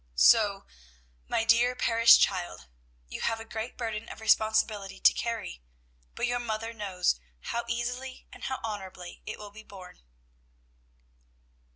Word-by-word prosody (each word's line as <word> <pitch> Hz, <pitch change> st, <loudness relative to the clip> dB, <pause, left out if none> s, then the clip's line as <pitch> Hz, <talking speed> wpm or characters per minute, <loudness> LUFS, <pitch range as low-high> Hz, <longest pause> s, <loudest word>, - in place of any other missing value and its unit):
"So, 200 Hz, -, +5 dB, 0.6 s
my 225 Hz, -, +1 dB
dear 235 Hz, +2 st, +4 dB
parish 230 Hz, -1 st, +6 dB
child, 175 Hz, -, 0 dB, 0.4 s
you -, -, -7 dB
have 225 Hz, -1 st, 0 dB
a 225 Hz, -, -8 dB
great 225 Hz, +2 st, -6 dB
burden 225 Hz, -2 st, -4 dB
of -, -, -9 dB
responsibility 220 Hz, -2 st, +1 dB
to -, -, +6 dB
carry; 230 Hz, -, -4 dB, 0.5 s
but -, -, -1 dB
your 245 Hz, 0 st, 0 dB
mother 225 Hz, -1 st, -4 dB
knows 190 Hz, -, 0 dB, 0.2 s
how 235 Hz, -, -3 dB
easily 245 Hz, +2 st, -4 dB
and -, -, -9 dB
how 260 Hz, -, -3 dB
honorably 190 Hz, -5 st, -7 dB
it 215 Hz, -, -5 dB
will 210 Hz, -1 st, -10 dB
be 215 Hz, +2 st, -12 dB
borne." 190 Hz, -4 st, -13 dB
220 Hz, 140 wpm, -29 LUFS, 200-235 Hz, 0.6 s, parish